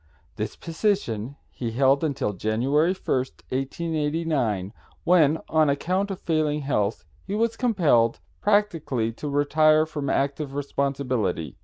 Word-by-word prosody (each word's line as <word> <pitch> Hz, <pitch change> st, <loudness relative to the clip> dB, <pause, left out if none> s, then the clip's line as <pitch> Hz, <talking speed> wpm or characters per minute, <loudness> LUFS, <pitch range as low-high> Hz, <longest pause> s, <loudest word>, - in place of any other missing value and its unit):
This -, -, -4 dB
position 160 Hz, -, -2 dB, 0.2 s
he 120 Hz, -, -4 dB
held 135 Hz, +5 st, +3 dB
until 140 Hz, -8 st, -1 dB
January 130 Hz, -, +1 dB
1st, 130 Hz, -7 st, -2 dB
1889, 145 Hz, -, -1 dB, 0.3 s
when 160 Hz, -3 st, +4 dB
on 155 Hz, -2 st, +3 dB
account 185 Hz, +8 st, 0 dB
of 195 Hz, -, -4 dB
failing 155 Hz, -2 st, 0 dB
health 105 Hz, -10 st, -1 dB, 0.2 s
he 200 Hz, -, -4 dB
was 230 Hz, +1 st, +1 dB
compelled, 160 Hz, -, +2 dB, 0.2 s
practically, 165 Hz, -, +1 dB
to 145 Hz, +6 st, -6 dB
retire 155 Hz, +2 st, +4 dB
from 150 Hz, -3 st, -4 dB
active 140 Hz, +1 st, -1 dB
responsibility. 130 Hz, -, -2 dB
145 Hz, 120 wpm, -25 LUFS, 125-165 Hz, 0.3 s, when